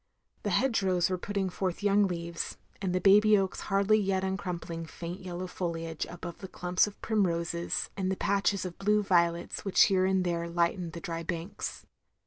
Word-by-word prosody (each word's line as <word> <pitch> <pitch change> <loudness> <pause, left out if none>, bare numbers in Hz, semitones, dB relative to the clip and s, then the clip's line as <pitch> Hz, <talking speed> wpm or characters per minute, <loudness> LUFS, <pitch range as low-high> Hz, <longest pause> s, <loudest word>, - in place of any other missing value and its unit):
The - - -2
hedge 255 -6 +2
rows 185 -2 +2
were 185 - 0
putting 200 0 -1
forth 185 +1 -3
young 205 0 +4
leaves, 170 -1 -4 0.2
and 190 -2 -1
the 185 - +1
baby 210 +3 +6
oaks 190 -2 -1
hardly 200 +2 +4
yet 190 -2 0
uncnun 190 -2 -2
pling 165 -1 -6
faint 175 +3 -7
yellow 180 0 -5
foliage, 165 -3 -4
above 175 0 -8
the 190 - -7
clumps 180 +1 +1
of 205 - -10
primroses 170 -5 0
and 190 -1 -1
the 190 - -2
patches 200 -1 +1
of 175 -2 -7
blue 210 +1 +3
violets 170 -2 +1
which 195 - +5
here 190 -2 +3
and 190 -1 +2
there 170 -1 -1
lightened 170 0 0
the 170 - -7
dry 165 -3 -4
banks. 170 +4 -5
185 Hz, 185 wpm, -30 LUFS, 170-195 Hz, 0.2 s, baby